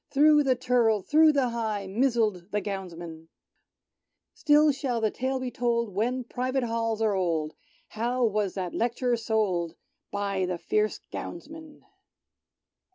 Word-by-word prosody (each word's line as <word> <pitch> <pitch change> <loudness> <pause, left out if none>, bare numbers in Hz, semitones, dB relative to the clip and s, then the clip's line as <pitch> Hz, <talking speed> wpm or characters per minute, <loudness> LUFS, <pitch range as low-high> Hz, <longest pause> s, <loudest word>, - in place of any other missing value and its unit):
Thro' 300 +1 +5
the 265 -3 +2
Turl— 235 -4 +2
through 310 - +5
the 270 -4 +2
High 220 -4 -2
Mizzled 215 -4 0
the 210 - 0
Gownsmen! 175 -5 -7 1.1
Still 300 0 +4
shall 260 -4 -2
the 220 -2 +1
tale 260 +1 -2
be 255 -1 -4
told, 235 -4 -1
■When 245 +4 -1
Private 255 +2 -1
Halls 225 -1 -1
are 215 -2 +2
old, 165 -5 -1 0.4
How 240 +3 0
was 210 -3 0
that 185 -3 -4
Lect'rer 240 +1 0
sold 205 -7 -1 0.3
By 200 -2 -1
the 180 -1 -2
fierce 425 - 0
Gownsmen 315 -2 -8
230 Hz, 135 wpm, -27 LUFS, 200-260 Hz, 1.1 s, Thro